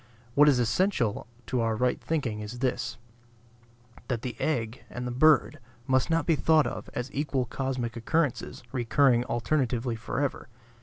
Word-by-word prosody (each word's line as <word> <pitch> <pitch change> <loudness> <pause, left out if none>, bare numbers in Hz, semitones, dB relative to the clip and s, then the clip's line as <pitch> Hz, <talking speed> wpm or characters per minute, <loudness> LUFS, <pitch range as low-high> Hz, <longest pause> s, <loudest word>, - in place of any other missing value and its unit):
What 150 +3 +6
is 135 - +4
essential 120 - +1 0.2
to 125 - -1
our 115 -1 +1
right 125 +3 0
thinking 135 -10 -2
is 105 +3 -6
this: 130 0 -2 1.1
that 120 -3 -2
the 125 -4 -4
egg 120 -6 -1
and 125 0 -5
the 125 - -3
bird 155 +3 +4 0.3
must 130 +2 +2
not 165 0 +1
be 165 - +3
thought 155 0 +4
of - - -5
as 125 +2 -4
equal 135 -3 -1
cosmic 125 -1 -3
occurrences 135 +2 -1
recurring 125 0 +3
alternatively 120 -1 0
forever. 130 +4 -3
125 Hz, 150 wpm, -28 LUFS, 120-145 Hz, 1.1 s, What